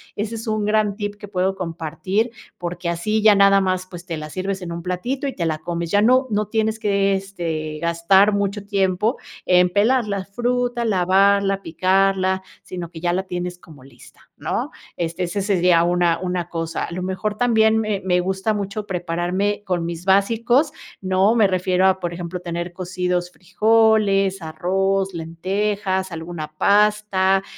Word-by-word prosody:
Ese 220 +2 -3
es 225 +1 -7
un 215 -1 0
gran 210 -1 +1
tip 205 -1 -4
que 205 0 -10
puedo 190 0 0
compartir, 180 +6 -2 0.3
porque 175 0 -4
así 215 +6 -1
ya 210 -1 +6
nada 200 0 +5
más, 185 -1 -1
pues, 175 -1 -10
te 165 -4 -4
la 155 0 -7
sirves 190 +3 -3
en 170 -1 -6
un 170 0 -5
platito 245 +10 -3
y 270 - -3
te 170 - -2
la 155 -1 -1
comes, 170 0 -4
ya 205 0 +4
no 255 +3 +4
no 210 0 0
tienes 220 0 -1
que, 200 -1 +1
este, 165 -5 -4
gastar 180 +5 +3
mucho 200 0 -2
tiempo 200 +3 0 0.3
en 180 0 +4
pelar 220 +4 +2
la 200 -2 -3
fruta, 240 +2 -1
lavarla, 195 0 +3
picarla, 190 +2 +1 0.2
sino 175 -2 -7
que 165 -2 -10
ya 175 +1 0
la 190 +1 0
tienes 180 -1 -5
como 150 -7 -16
lista, 130 -3 -18 0.2
¿no? - - -3 0.3
Este, 170 +1 -2
ese 185 +3 -2
sería 180 -4 +3
una 175 -1 +2
una 180 -2 -3
cosa 165 -1 -3
a - - -10
lo 180 +1 -4
mejor 195 +3 -2
también 220 -2 +3
me 215 -3 -1
me 180 -1 +2
gusta 190 +4 -1
mucho 205 +1 -4
prepararme 180 +3 -1
con 175 -3 -1
mis 170 +1 -6
básicos, 230 +9 +3 0.3
¿no?, 190 +4 +2
me 220 -3 +5
refiero 185 0 +1
a, 190 0 +2
por 175 -1 -3
ejemplo, 175 +1 -5
tener 175 0 -5
cocidos 180 -1 -2
frijoles, 200 -1 +2
arroz, 190 +4 -1
lentejas, 190 +3 -2
alguna 165 -1 -6
pasta, 200 -2 +3
190 Hz, 170 wpm, -21 LUFS, 175-205 Hz, 0.3 s, ya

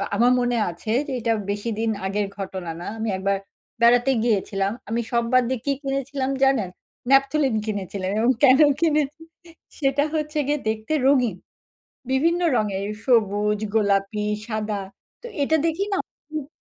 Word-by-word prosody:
আমার 240 +4 +4
মনে 245 -1 +1
আছে 175 +5 -6 0.2
যে, - - -4
এটা 230 0 +1 0.2
বেশিদিন 220 +2 -2 0.2
আগের 200 +1 -1
ঘটনা, 185 -3 -5
না - - -6
আমি 220 0 -1
একবার 195 +1 0 0.4
বেড়াতে 245 +2 +5
গিয়েছিলাম, 200 -3 0 0.2
আমি 230 +1 0
সব 235 -1 +2
বাদ 255 0 +5
দিয়ে 260 -2 -1
কি 280 - +2
কিনেছিলাম 275 0 -2
জানেন? 260 -9 +3 0.4
ন্যাপথলিন 275 -1 +3
কিনেছিলেন 195 -2 -3
এবং 235 +3 +4
কেন 265 +1 +7 0.2
কিনেছি 305 -1 +1 0.6
সেটা 275 0 +2
হচ্ছে 305 0 -2
গিয়ে 295 0 +1
দেখতে 220 +7 -3
রঙিন। 250 -8 +3 0.8
বিভিন্ন 330 +7 +2 0.2
রঙের 200 -2 -1 0.2
সবুজ, 210 -3 +2 0.2
গোলাপি, 205 0 +1 0.2
সাদা 215 -2 -2 0.4
তো - - -7 0.2
এটা 315 +3 +3
দেখি 330 +5 0
না - - 0 0.3
হুম। 305 -3 -4
235 Hz, 145 wpm, -23 LUFS, 205-275 Hz, 0.8 s, কেন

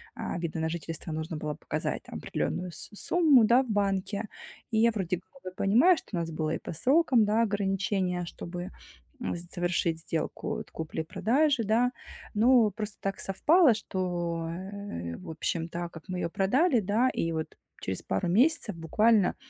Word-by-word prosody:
а, - - -4
вида 165 -1 -3
на 160 0 0
жительство 165 0 -5
нужно 160 +1 -4
было 150 0 -3
показать - - -3
там - - -10
определенную 180 0 -3
с - - -10
сумму, 300 - +4
да, 240 +4 +5
в 255 - -10
банке. 200 0 0 0.5
И 220 - +1
я 230 +1 +5
вроде 190 -4 -1
как 275 +8 -22
бы 185 - -6
понимаю, 245 - +5
что - - -11
у - - 0
нас 165 -1 -3
было 155 0 -2
и - - -1
по - - -6
срокам, 260 - +4
да, 215 +2 +2
ограничение, 195 -3 0
чтобы, 175 +2 -6 0.5
м, 240 - -2
завершить 175 -1 -1
сделку 160 -1 -3
вот - - -8
купли-продажи, 210 - 0
да. 230 +4 +2 0.4
Ну, 230 0 +5
просто 210 +1 -6
так 195 0 -2
совпало, 295 - +4
что, 175 -5 -2
э, 185 - -6
в - - -10
общем, 165 +1 -2
да, 170 0 -4
как 160 -2 -11
мы 185 -1 -3
ее 170 - -1
продали, 250 - +3
да. 215 +6 +2
И 165 -8 -1
вот 160 -1 -4 0.2
через 95 0 -4
пару 95 - -1
месяцев 235 - +2
буквально, 210 +5 +3
195 Hz, 170 wpm, -29 LUFS, 170-225 Hz, 0.5 s, да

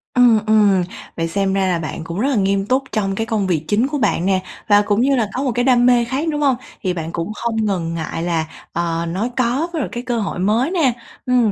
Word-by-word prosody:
Ừm, 240 -3 +6
ừm, 205 -4 +4 0.3
vậy 165 0 0
xem 195 +2 0
ra 195 -1 +1
là 175 -2 +1
bạn 160 0 -5
cũng 170 +3 -5
rất 260 - +1
là 275 - +1
nghiêm 195 -1 +1
túc 260 +4 +1
trong 195 -2 -1
cái 225 - -1
công 215 -4 -1
việc 160 -4 0
chính 220 +6 +2
của 290 - -2
bạn 210 -8 +1
nè, 190 -1 +2 0.3
và 205 0 +6
cũng 205 +1 +1
như 275 +2 +3
là 225 -4 0
có 265 - -2
một 260 - 0
cái 245 +1 +1
đam 245 -2 +4
mê 245 -1 +4
khác, 270 +7 -2
đúng 295 - -2
hông? 275 -3 +3 0.3
Thì 185 -1 0
bạn 165 -1 -5
cũng 170 +5 -3
không 225 0 -1
ngần 170 -5 -1
ngại 165 0 -4
là, 165 -2 -1 0.3
ờ, 170 0 -1
nói 200 +8 -2
có 255 +7 +1
với 325 - -1
lại 270 - -2
cái 240 0 -5
cơ 240 -2 -1
hội 200 -4 -3
mới 225 - +1
nè. 300 -10 +2 0.3
Ừm. 245 -4 +3
215 Hz, 260 wpm, -19 LUFS, 185-245 Hz, 0.3 s, Ừm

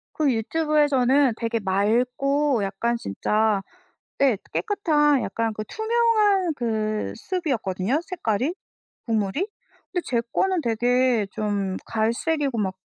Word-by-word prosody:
그 295 -4 +2
유튜브에서는 285 0 +2
되게 230 0 -1
맑고 245 +6 +1
약간 220 +5 -1
진짜 210 - 0 0.6
네 265 -6 +4 0.2
깨끗한 295 - +2
약간 230 -1 -2
그 215 - -5
투명한 435 - +2
그 215 -3 -2
soup 360 +2 -3
이었거든요 210 - 0
색깔이 285 - -1 0.5
국물이. 225 - 0 0.4
근데 355 - -1
제 235 -2 0
거는 375 -3 +1
되게 240 -1 +2
좀 200 -3 -2
갈색이고 240 +5 0
막 190 -2 -1
245 Hz, 250 characters per minute, -24 LUFS, 215-305 Hz, 0.6 s, 네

